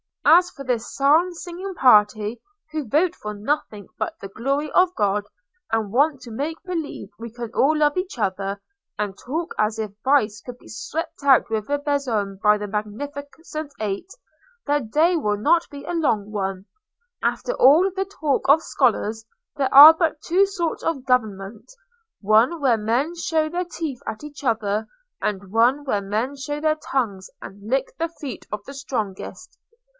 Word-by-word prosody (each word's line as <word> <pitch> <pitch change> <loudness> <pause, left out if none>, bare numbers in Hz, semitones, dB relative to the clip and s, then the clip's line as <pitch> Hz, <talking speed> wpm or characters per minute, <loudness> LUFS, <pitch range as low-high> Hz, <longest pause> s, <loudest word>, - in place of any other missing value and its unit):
As 355 +2 +6
for 275 - -10
this 245 -3 -2
psalm 310 +6 +4
singing 355 +3 -7
party, 215 -3 +4 0.3
who 310 -4 -4
vote 330 +9 +2
for 210 0 -6
nothing 210 -3 -3
but - - -2
the 195 - -8
glory 275 +8 -2
of 365 0 +4
God, 205 0 0 0.5
and 220 -3 0
want 280 +3 +2
to 240 - -10
make 290 +8 -4
believe 330 - -5
we 230 0 -7
can 235 -1 -7
all 305 +3 +3
love 295 +1 +2
each 365 -5 -3
other, 195 -1 -2 0.4
and 205 -2 -3
talk 320 +6 -4
as 215 +1 +1
if 215 -2 -3
vice 225 -7 +2
could 245 -1 -9
be - - -17
swept 290 +7 -5
out 270 -4 +5
with 215 +1 -2
a 290 - +1
besom 245 -9 -1
by 210 0 +5
the 210 0 -5
Magnificent 285 +8 -6
Eight, 210 - -3 0.6
their 290 0 +2
day 305 +9 +2
will 210 -10 0
not 330 +11 +2
be 285 -1 -9
a - - -4
long 220 -11 0
one. 195 -2 -3 0.6
After - - -1
all 320 - +5
the 385 +1 -2
talk 310 -8 -2
of 305 +3 +6
scholars, 225 -4 0 0.3
there 275 -2 -1
are 295 +4 +12
but 320 -2 -1
two 375 +4 +3
sorts 345 -4 -3
of 280 -6 -2
government: 215 -4 -1 0.5
one 225 - +3
where 260 -5 +3
men 240 +10 0
show 320 -2 0
their 355 +2 -2
teeth 320 -6 -5
at 220 +5 -5
each 290 -2 -10
other, 220 -3 0 0.3
and 200 -2 -3
one 245 +6 +3
where 210 -8 -1
men 215 +8 -2
show 290 +2 -4
their 310 0 +2
tongues 220 -11 -3
and 200 +2 -10
lick 265 +1 -1
the 330 +2 -1
feet 280 -4 -7
of 210 -1 -4
the 275 - -9
strongest. 255 - -5
265 Hz, 170 wpm, -23 LUFS, 215-310 Hz, 0.6 s, are